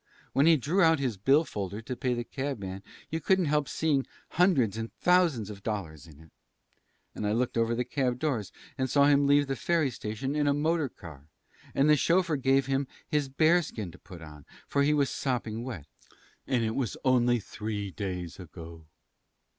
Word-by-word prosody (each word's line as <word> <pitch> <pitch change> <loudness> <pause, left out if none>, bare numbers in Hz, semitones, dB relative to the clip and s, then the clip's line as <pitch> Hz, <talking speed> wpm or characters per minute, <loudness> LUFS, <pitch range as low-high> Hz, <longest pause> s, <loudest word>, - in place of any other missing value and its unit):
When 140 +4 +4
he 165 -1 +6
drew 160 +9 +1
out 165 -2 +5
his 130 -5 -1
bill 135 - +3
folder 100 -3 -5
to 120 +3 -5
pay 125 -1 -1
the 120 - -3
cab 135 +2 -4
man 95 -1 -6 0.3
you 160 +1 -2
couldn't 190 +3 +2
help 150 -2 +1
seeing 145 -4 0 0.2
hundreds 150 - +3
and 115 0 -5
thousands 165 - +2
of 100 -1 -10
dollars 85 -8 -5
in 75 -2 -16
it. 80 -2 -17 0.8
And 105 - -3
I 105 - +1
looked 120 +2 0
over 115 0 +1
the 125 +1 -1
cab 125 -1 -1
doors 125 -8 -2 0.3
and 130 0 0
saw 140 +2 +4
him 140 -1 +4
leave 145 0 +4
the 135 -1 -2
ferry 160 -2 +1
station 110 +5 -4
in 150 -1 +1
a 140 - +3
motor 155 -1 +1
car; 75 -9 -13 0.5
and 140 - +3
the 150 - +6
chauffeur 170 +1 +2
gave 135 0 +2
him 135 +1 0 0.2
his 150 -3 0
bearskin 155 - +1
to 90 - -16
put 90 -4 -12
on, 75 -2 -12 0.2
for 140 - +1
he 145 +1 +3
was 140 -2 +1
sopping 120 -4 -2
wet. 115 - -6 0.6
And 125 -3 +1
it 110 0 -1
was 130 -3 -2
only 120 -2 +3
three 105 -1 -5
days 90 -2 -5
ago." 85 -3 -11
130 Hz, 195 wpm, -29 LUFS, 105-145 Hz, 0.8 s, he